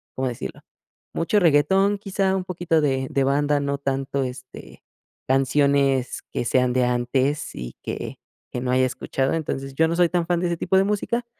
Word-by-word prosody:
¿cómo 130 0 -1
decirlo?, 120 - -7 0.5
mucho 170 +5 +1
reguetón, 190 +5 +3
quizá 195 -1 0
un 185 - -4
poquito 175 -3 0
de 135 -2 0
de 135 - +1
banda, 145 +1 +2
no 140 0 -1
tanto, 135 0 -2
este, 130 0 -9 0.4
canciones 135 0 +2
que 120 - -2
sean 125 0 +2
de 125 -1 +2
antes 130 +4 0
y - - -7
que - - -5 0.3
que 120 - -4
no 125 0 -1
haya 130 0 +3
escuchado. 130 +2 -1
Entonces, 135 -4 -3
yo 160 +3 +3
no 170 - 0
soy 175 -1 +5
tan 175 -2 0
fan 175 -1 +1
de 180 - +1
ese 170 -1 -1
tipo 180 - 0
de 190 - +5
música, 220 +4 -1
140 Hz, 185 wpm, -23 LUFS, 130-175 Hz, 0.5 s, soy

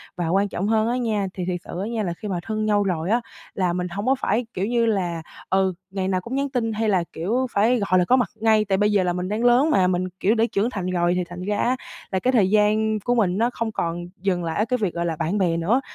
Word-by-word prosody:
Và 175 -2 -2
quan 195 +3 +2
trọng 195 - -2
hơn 220 0 +2
á 245 +2 0
nha, 215 -5 0
thì 180 - -4
thiệt 180 -1 -2
sự 175 - -6
á 205 - -3
nha, 230 -2 -2
là 175 -3 -2
khi 210 - -8
mà 185 -3 -2
thân 215 +1 -2
nhau 205 -1 +2
rồi 180 -2 -1
á, 235 +2 +2 0.3
là 180 -3 0
mình 180 0 -2
hông 200 +4 -5
có 265 - +3
phải, 230 -1 0
kiểu 185 - -1
như 235 +1 +1
là, 180 -6 0 0.3
ừ, 190 -1 +2 0.2
ngày 190 -1 -2
nào 185 -1 0
cũng 240 +8 -5
nhắn 280 0 0
tin 230 -4 -1
hay 220 0 0
là, 185 -4 +2
kiểu, 235 +10 -1
phải 230 +5 +3
gọi 185 0 +4
là 180 - +2
có 250 - +4
mặt 250 -5 +1
ngay. 220 -1 +3
Tại 195 -1 +1
bây 210 +1 +2
giờ 200 -2 +3
là 175 -1 0
mình 180 +1 -3
đang 215 +3 -1
lớn 245 +5 +5
mà, 185 -11 +4
mình, 185 0 0
kiểu, 215 +5 +2
đã 225 - +2
trưởng 210 +4 +1
thành 200 -7 -4
rồi, 175 -1 +1
thì 180 - 0
thành 175 +1 -9
ra 205 +2 -1
á, 250 +2 +1 0.4
là 190 - +1
cái 255 - +1
thời 200 -6 +4
gian 215 +1 +2
của 245 +4 0
mình 195 -5 +2
nó 235 +2 +2
không 230 -1 -2
còn 175 -3 -3 0.2
dừng 185 -3 0
lại 165 -1 -3
ở 215 - +2
cái 250 +2 0
việc 195 -5 0
gọi 170 0 -2
là 165 -1 -1
bạn 170 +6 -1
bè 175 -4 +1
nữa. 210 +11 +2
200 Hz, 295 wpm, -23 LUFS, 180-225 Hz, 0.4 s, lớn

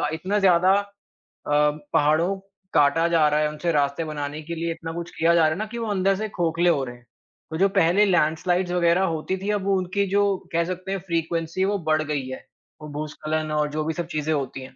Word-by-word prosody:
क 150 - 0
इतना 190 +5 -1
ज़्यादा 185 0 +5 0.5
अ, 150 0 0 0.2
पहाड़ों 155 +6 +3 0.4
काटा 150 +3 +4
जा 160 -3 +4
रहा 150 +1 +1
है, 150 - +1
उनसे 150 +3 -2
रास्ते 145 +1 +1
बनाने 150 0 -5
के 170 +2 -5
लिए 165 +1 -2
इतना 165 0 -6
कुछ 170 0 -5
किया 165 +1 +4
जा 170 - +5
रहा 155 - +5
है 160 - -2
ना 215 - -1
कि 235 - -5
वो 225 - -3
अंदर 195 0 +2
से 215 +2 -3
खोखले 175 -1 +1
हो 145 -5 +2
रहे 120 -1 -8
हैं। 120 - -21 0.5
तो 160 - -3
जो 195 +2 +3
पहले 180 +6 +4
लैंडस्लाइड्स 175 0 +1
वगैरह 175 +1 +3
होती 160 +4 -2
थी, 195 +2 -5
अब 200 -2 -2
उनकी 190 +1 +1
जो 205 +1 +3 0.3
कह 170 - +2
सकते 185 +1 -5
हैं 195 - -1
फ़्रीक्वेंसी 165 +2 -1
वो 205 +1 0
बढ़ 155 0 +3
गई 145 -3 -3
है 130 - -8 0.4
और 150 - -8
भूस्खलन 155 +1 -3
और 150 -1 0
जो 155 +1 -2
भी 160 - -1
सब 170 0 -4
चीज़ें 155 +1 0
होती 135 -2 -3
हैं। 130 - -12
165 Hz, 230 wpm, -24 LUFS, 150-185 Hz, 0.5 s, ज़्यादा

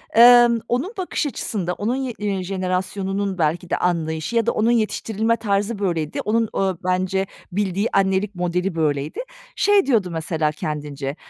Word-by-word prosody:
emm, 240 0 +8
onun 265 - -1
bakış 365 -3 -2
açısında, 190 -9 -3
onun 225 +7 -1
ye 265 -2 -3
eee, 200 -3 -2
jenerasyonunun 190 +1 -2
belki 170 +2 0
de - - +1
anlayışı 160 +2 -1
ya 230 -1 +3
da - - +2
onun 225 +2 +2
yetiştirilme 225 0 0
tarzı 205 +1 -1
böyleydi, 165 -6 -1
onun, 225 +1 +1
ooo, 190 -2 0
bence 185 +1 0 0.2
bildiği 200 +2 0
annelik 195 +1 +1
modeli 180 +1 -1
böyleydi. 150 -2 -1 0.4
Şey 410 -2 +4
diyordu 220 -9 +2
mesela 160 -1 -1
kendince: 145 -2 -4
195 Hz, 150 wpm, -22 LUFS, 175-225 Hz, 0.4 s, emm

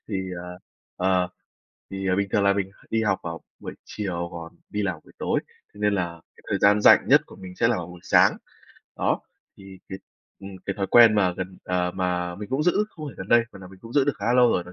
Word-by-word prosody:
Thì, 100 -3 -2 0.2
à, - - -9 0.5
ờ, 90 -1 +1 0.6
thì 95 0 -4
bình 100 0 0
thường 100 - +2
là 100 - +5
mình 100 -1 -2 0.2
đi 115 0 +1
học 95 -3 +1
vào 85 0 -6 0.2
buổi - - -7
chiều 90 -5 -4
còn 85 0 -9
đi 105 - -2
làm 90 -5 -2
buổi - - -19
tối, - - 0 0.3
thế 105 - -13
nên 105 0 +2
là 85 -3 -3 0.2
cái - - -21
thời - - 0
gian 105 +1 +5
rảnh - - +6
nhất - - +6
của - - -14
mình 90 -1 -10
sẽ 115 - +3
là 120 - +1
buổi 90 0 -7
sáng. - - +4 0.6
Đó, - - 0 0.4
thì 95 -1 -13
cái 95 - -6 0.4
ừm, 100 0 -8 0.2
cái 100 - -2
thói 100 -2 -1
quen 115 +1 +7
mà 95 -4 +2
gần, 95 0 -6
ờ, 90 -1 0
mà 90 -1 -1
mình 105 +2 -8
cũng 135 +3 0
giữ 180 +5 +2
không 155 -7 -9
phải - - -10
gần 95 - -8
đây, 120 - +6
mà - - -11
là 95 - -10
mình 95 0 -15
cũng 115 +1 -10
giữ 140 -2 +4
được 145 - +1
khá 100 - -4
là 120 - +3
lâu 125 -1 +5
rồi 90 - 0
đó 90 - -12
95 Hz, 250 wpm, -24 LUFS, 90-105 Hz, 0.6 s, quen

